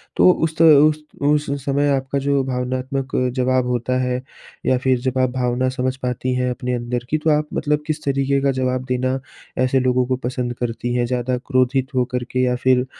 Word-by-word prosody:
तो - - +6
उस 160 -2 -1
तो 165 - +5 0.2
उस 155 0 -2 0.2
उस 150 0 +2 0.2
समय 145 +1 +1
आपका 135 +1 -2
जो 140 0 +1
भावनात्मक 130 +1 -3 0.2
जवाब 130 -1 +1
होता 125 +1 0
है 125 0 -1 0.4
या 130 - +3
फिर 130 0 +1
जब 130 +1 -2
आप 130 -1 +3
भावना 125 0 0
समझ 130 0 -2
पाती 125 0 -2
हैं 125 0 0
अपने 125 0 -3
अंदर 120 0 -3
की। 155 - +1
तो 155 +1 0
आप 150 0 -2
मतलब 150 0 0
किस 155 0 -2
तरीक़े 140 0 +1
का 140 0 +2
जवाब 130 -1 -1
देना 130 +1 0 0.4
ऐसे 130 +1 +2
लोगों 125 0 +2
को 130 - +1
पसंद 125 -1 -3
करती 120 0 -2
हैं? 120 -1 +1
ज़्यादा 125 +1 -1
क्रोधित 130 +1 0
होकर 125 0 0
के 130 - -1
या 125 0 +2
फिर 125 0 +2
130 Hz, 200 wpm, -20 LUFS, 125-135 Hz, 0.4 s, तो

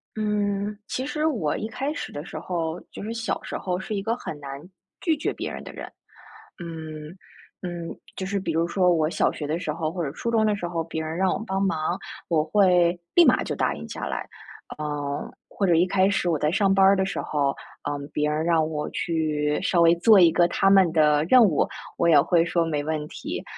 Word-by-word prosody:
嗯， 205 -1 -1
其 260 - -3
实 300 +2 -2
我 215 - 0
一 215 - -3
开 265 +6 -3
始 - - -6
的 145 +2 -7
时 - - -7
候， 165 -2 -3
就 - - -8
是 220 +2 -4
小 230 0 -3
时 - - -5
候 180 -1 -2
是 190 +3 -5
一 200 - -1
个 225 +4 -1
很 155 -10 -7
难， 140 -1 -7 0.4
拒 330 -4 +1
绝 290 - -1
别 - - -5
人 - - -7
的 - - -9
人。 - - -9 0.7
嗯， 155 -2 -7 0.5
嗯， 175 -2 -5 0.2
就 190 - -4
是 200 +1 -1
比 180 -3 -3
如 165 +1 +1
说 180 0 +2
我 155 -2 +1
小 - - +1
学 150 - -6
的 155 +3 -2
时 155 - -3
候 155 0 -2
或 175 0 -3
者 140 - -3
初 235 +9 -3
中 220 -1 +3
的 210 -1 +2
时 175 -3 -4
候， 165 -1 -2
别 160 -1 -4
人 160 +1 -4
让 190 0 +2
我 - - -2
帮 195 -3 -1
忙， 175 -2 0 0.3
我 160 -3 +2
会 180 0 +3 0.2
立 345 - +8
马 - - +4
就 - - -3
答 - - 0
应 - - -8
下 - - -5
来。 - - -4 0.5
呃， 145 -1 -3 0.2
或 200 - -1
者 170 - +4
一 170 +2 +4
开 190 +1 +2
始 190 -3 0
我 160 -3 +1
在 150 - +1
上 195 +1 +3
班 195 0 +4
儿 195 +1 +6
的 190 0 +1
时 195 - -3
候， 145 -2 0 0.3
呃， 145 0 -3
别 150 0 0
人 155 +1 -1
让 165 -2 +2
我 150 -1 -3
去 150 -3 -1
稍 175 - +2
微 165 0 +6
做 205 +4 +6
一 170 -2 +7
个 170 +1 +4
他 195 +2 +2
们 190 -3 +5
的 150 -2 +3
任 250 +7 +7
务， 165 -8 +2 0.3
我 170 - +3
也 155 -3 +7
会 165 +3 +3
说： 170 0 +1
“没 150 -3 -1
问 155 0 -3
题。 - - -6
170 Hz, 250 characters per minute, -25 LUFS, 155-195 Hz, 0.7 s, 立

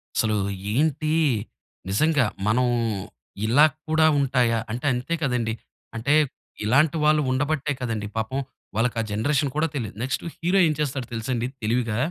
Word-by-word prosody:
అసలు 110 -1 +2 0.4
ఏంటి 155 +2 +1 0.8
నిజంగా 145 +6 +3 0.2
మనం 125 +3 +3 0.8
ఇలా 130 +8 +6 0.2
కూడా 160 0 +4
ఉంటాయా. 125 -4 +2
అంటే 125 +4 -4
అంతే 125 +7 -2
కదండీ. 120 -5 0 0.4
అంటే 135 +6 +1 0.5
ఇలాంటి 140 +8 +3
వాళ్ళు 155 0 +4
ఉండబట్టే 145 +1 0
కదండీ. 110 -4 -2
పాపం 110 +5 -1 0.4
వాళ్ళకా 115 0 +1
జనరేషన్ 140 +6 +1
కూడా 160 +1 +2
తెలీదు. 110 -7 -4
నెక్స్టు 130 -2 -2
హీరో 180 +4 +2
ఏం 155 - +1
చేస్తాడో 135 -4 -2
తెలుసండి 120 +1 -2 0.2
తెలివిగా... 115 0 0
130 Hz, 130 wpm, -24 LUFS, 115-150 Hz, 0.8 s, ఇలా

